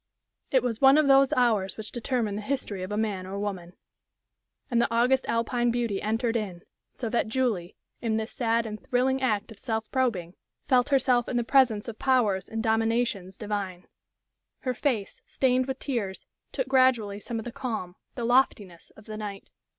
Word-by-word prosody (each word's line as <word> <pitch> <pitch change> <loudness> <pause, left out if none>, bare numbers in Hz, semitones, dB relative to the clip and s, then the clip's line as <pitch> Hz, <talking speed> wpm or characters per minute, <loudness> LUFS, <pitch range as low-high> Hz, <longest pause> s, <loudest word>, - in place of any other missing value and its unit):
It 260 -3 +3
was 230 -3 -2
one 270 +1 +7
of 305 -2 +4
those 270 0 +6
hours 220 -6 +2
which 220 -1 -6
determine 240 -4 -1
the 210 - -3
history 210 -5 -3
of 185 +2 -5
a 210 - -1
man 200 -4 -2
or 195 +1 -5
woman. 190 -4 -4 1.0
And 235 -1 +3
the - - 0
august 250 +3 +3
Alpine 240 +1 +1
beauty 230 -4 -1
entered 225 +2 0
in, 190 -6 -3 0.3
so 240 - -5
that 235 0 0
Julie, 220 -7 -1 0.3
in 225 -2 0
this 220 +1 -3
sad 230 -1 +1
and 215 -1 -6
thrilling 260 +2 +1
act 215 -4 0
of 210 - -11
self 220 -3 -3
probing, 215 -10 0 0.3
felt 250 0 +3
herself 255 -3 +3
in 245 - -1
the 240 - +1
presence 235 -4 +3
of 225 -2 -7
powers 220 -8 +2
and 225 0 -3
dominations 225 -4 0
divine. 200 -4 -4 0.8
Her 255 -3 -1
face, 245 -6 -2
stained 255 -1 +1
with 265 -1 -3
tears, 225 -10 -3 0.3
took - - -2
gradually 245 -6 +3
some 230 +3 -5
of 225 - -5
the 240 - -5
calm, 220 -8 -4 0.2
the 240 -3 -3
loftiness 220 -8 +1
of 215 - -15
the 215 -1 -7
night. 205 -2 -7
230 Hz, 180 wpm, -27 LUFS, 205-250 Hz, 1.0 s, one